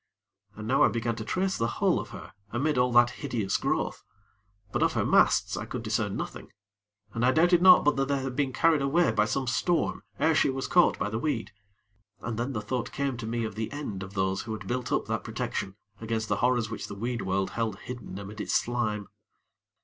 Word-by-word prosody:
And 110 0 -7
now 130 +3 +2
I - - +7
began 115 0 -1
to 110 - -4
trace 190 - -1
the 115 - +1
hull - - +2
of - - -6
her - - -10 0.2
amid 145 +7 0
all 125 0 +3
that 120 0 +6
hideous 115 -9 -1
growth; - - -1 0.7
but - - -1
of - - +3
her - - 0
masts, - - +3
I - - -4
could - - -5
discern - - -1
nothing; - - -6 0.6
and 115 - -2
I 125 - +5
doubted 175 +5 +4
not 185 0 +8
but 150 -1 +3
that 135 0 +1
they 140 0 +1
had 130 -2 -4
been 140 -1 0
carried 160 +1 +3
away 150 +2 +3
by 105 -1 +2
some 130 +5 -1
storm 170 +7 0 0.2
ere 160 +2 +3
she 155 - +3
was 135 0 -2
caught 175 0 +4
by 105 - -2
the 110 - -2
weed; 115 -8 -2 0.7
and 115 0 -4
then 125 +3 -2
the 105 -2 -3
thought 120 +2 -3
came 140 -2 -1
to 115 -1 -6
me 115 0 -1
of 110 - -5
the 110 +1 -4
end 140 -10 -5
of 95 +2 -8
those 95 0 0
who 110 - -5
had 110 - -7
built 125 0 -3
up - - +1
that - - -2
protection 95 - -4 0.2
against 110 -1 -3
the 105 - +1
horrors 120 -2 +1
which 110 - -5
the 100 - -7
weed 120 +3 -3
world 95 0 -1
held 115 -4 -2
hidden 120 -6 -7
amid 100 +2 -7
its - - -1
slime. 110 -4 0
120 Hz, 225 wpm, -28 LUFS, 110-135 Hz, 0.7 s, not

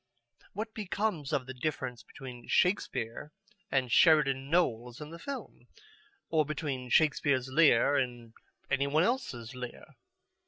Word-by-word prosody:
What 220 +2 -5
becomes 200 -7 -2
of 130 - 0
the 130 - -7
difference 130 -3 -3
between 125 +1 -11
Shakespeare 150 - 0 0.4
and 130 -3 0
Sheridan 140 -3 +4
Knowles 125 -8 0
in 150 +1 -8
the 170 - -9
film? 240 - -8 0.6
Or 160 -1 +4
between 140 -4 -4
Shakespeare's 140 -2 +2
Lear 140 -2 +5
and 120 -3 -3 0.4
any 140 +1 +2
one 155 +3 +3
else's 160 - -2
Lear? 125 -1 -9
140 Hz, 125 wpm, -31 LUFS, 125-160 Hz, 0.6 s, Lear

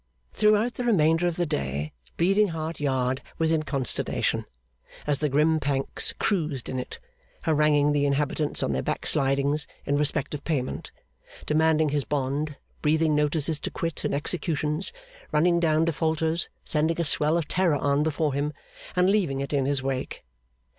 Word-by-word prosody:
Throughout 215 +3 +3
the 250 - -4
remainder 165 -6 +3
of 175 - -1
the 175 - 0
day, 70 - -2 0.2
Bleeding 195 +5 +3
Heart 160 -2 -4
Yard 130 -2 0 0.2
was 160 -1 +1
in 160 -1 +2
consternation, 135 -5 -1 0.6
as 145 -2 +1
the 150 - 0
grim 155 +3 +3
Pancks 140 -2 0
cruised 155 - -1
in 130 - -2
it; 125 - -6 0.5
haranguing 150 -2 +3
the 145 -1 +2
inhabitants 145 +1 0
on - - 0
their 65 -1 0
backslidings 140 - +1 0.2
in 145 - +1
respect 150 -1 0
of 145 - -5
payment, 140 -6 -3 0.5
demanding 155 0 +3
his 145 -1 0
bond, 145 +2 -2 0.2
breathing 155 +1 +2
notices 150 +1 +1
to - - -4
quit 165 -2 -4
and - - 0
executions, 155 +1 -1 0.4
running 170 +3 +3
down 160 -1 +2
defaulters, 160 0 0 0.2
sending 160 +2 +1
a 170 - +1
swell 150 +2 +3
of 165 -4 -2
terror 180 -4 +2
on 140 0 +1
before 155 -1 0
him, 145 +2 -1 0.4
and 180 0 +3
leaving 190 -9 +1
it 140 +2 -4
in 135 -2 +1
his 140 -2 0
wake. 135 -1 -3
150 Hz, 160 wpm, -26 LUFS, 140-165 Hz, 0.6 s, Throughout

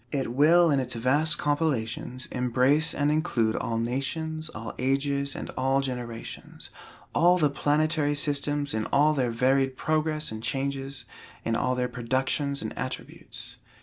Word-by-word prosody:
It 135 -4 -2
will 165 +5 +5
in 140 - +3
its 125 -2 -2
vast 145 +6 +2
compilations, 130 -4 -1
embrace 130 +6 +2
and 145 +1 +1
include 120 -8 +1
all 115 - -2
nations, 155 +7 -3
all 115 +1 -7
ages, 140 +1 0
and - - -6
all 135 +1 +1
generations; 125 -4 -6 0.4
all 175 +2 +5
the 150 -5 +2
planetary 150 +1 +1
systems 145 0 0
in 110 -1 -1
all 150 +2 +3
their 130 -4 0
varied 130 +3 +1
progress 155 -1 0
and 110 0 -6
changes, 135 +2 -3 0.4
in 115 - 0
all 130 +2 0
their 125 0 0
productions 130 +3 -1
and - - -5
attributes. - - -7
135 Hz, 145 wpm, -27 LUFS, 125-150 Hz, 0.4 s, will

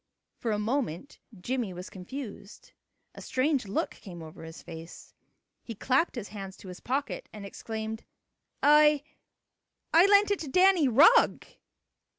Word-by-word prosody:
For 235 - -3
a 210 - 0
moment 225 - -3 0.2
Jimmie 240 -2 -2
was 180 +1 -8
confused. 210 - -9 0.4
A - - -11
strange 265 -2 0
look 195 - -2
came 175 -4 -11
over 155 0 -12
his 160 0 -10
face. 165 0 -11 0.5
He 230 - -8
clapped 265 - +1
his 230 -5 -6
hand 195 -1 -8
to 190 - -12
his 180 - -9
pocket 275 +3 -3
and 210 -2 -9
exclaimed: 220 +2 -6 0.6
"I 300 0 +5 0.9
I 340 +4 +7
lent 405 0 +5
it 405 - 0
to 315 - -6
Danny 365 +1 +4
Rugg." 300 - +5
235 Hz, 145 wpm, -28 LUFS, 195-295 Hz, 0.9 s, I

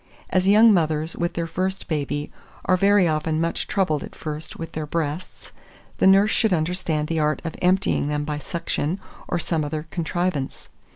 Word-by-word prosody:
As 185 0 +2
young 215 +2 +7
mothers 160 -2 0
with 170 0 -2
their 170 - -1
first 185 +3 -3
baby 145 -2 -2 0.3
are 185 - +4
very 200 0 +4
often 155 0 0
much 165 +1 -1
troubled 155 -7 0
at - - -10
first 155 0 -6
with 165 0 -6
their 155 -1 -4
breasts, 160 +2 -4 0.5
the - - +5
nurse 195 +3 +6
should 220 -4 +2
understand 160 -2 0
the 165 0 -1
art 150 0 +1
of 165 - -4
emptying 185 -4 +2
them 150 0 -1
by 150 -1 -3
suction, 170 +1 -2 0.3
or - - 0
some 165 -2 -1
other 150 +1 -3
contrivance. 170 -4 -2
165 Hz, 175 wpm, -23 LUFS, 155-185 Hz, 0.5 s, young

